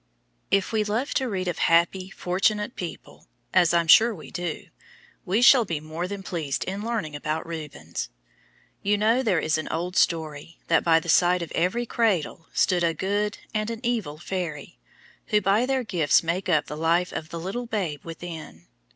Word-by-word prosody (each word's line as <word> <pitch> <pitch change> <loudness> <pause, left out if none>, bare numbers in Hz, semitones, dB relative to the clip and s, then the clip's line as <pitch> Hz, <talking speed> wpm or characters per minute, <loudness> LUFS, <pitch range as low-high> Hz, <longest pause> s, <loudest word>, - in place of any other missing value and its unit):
If 195 -1 +2
we 220 -1 +1
love 225 +7 -1
to 260 -2 0
read 185 -3 -2
of 175 - -2
happy, 175 +3 +2
fortunate 210 +5 0
people, 175 - -8 0.3
as 180 -2 +5
I 170 0 +4
am 165 - -6
sure 225 +7 +7
we 155 - -11
do, 175 -2 -4 0.6
we 205 +7 +2
shall 245 0 +8
be 170 -7 -3
more 155 +3 -5
than 200 0 -6
pleased 150 -7 -3
in 195 +2 -4
learning 220 -10 -3
about 155 +2 -3
Rubens. 160 -3 -6 0.7
You 205 +1 +2
know 225 +5 +3
there 215 -8 +1
is 155 0 0
an 155 - -5
old 175 +3 -3
story, 160 -2 0
that 165 - +4
by 165 -1 +5
the 165 - -11
side 175 +2 +4
of 170 - -8
every 185 +8 0
cradle 190 -8 0
stand 180 -2 +2
a 165 -1 +1
good 205 +2 -1 0.2
and 215 0 -1
an 230 -1 -4
evil 225 -11 -1
fairy, 170 -3 -5 0.5
who 210 - +3
by 210 +5 +2
their 265 -1 0
gifts 170 -10 +2
make 175 +4 -2
up 155 -4 +3
the 150 - -6
life 165 +3 +1
of 155 - -5
the 170 - -5
little 210 +8 -4
babe 180 -10 -3
within. 165 - -8
180 Hz, 185 wpm, -25 LUFS, 165-210 Hz, 0.7 s, shall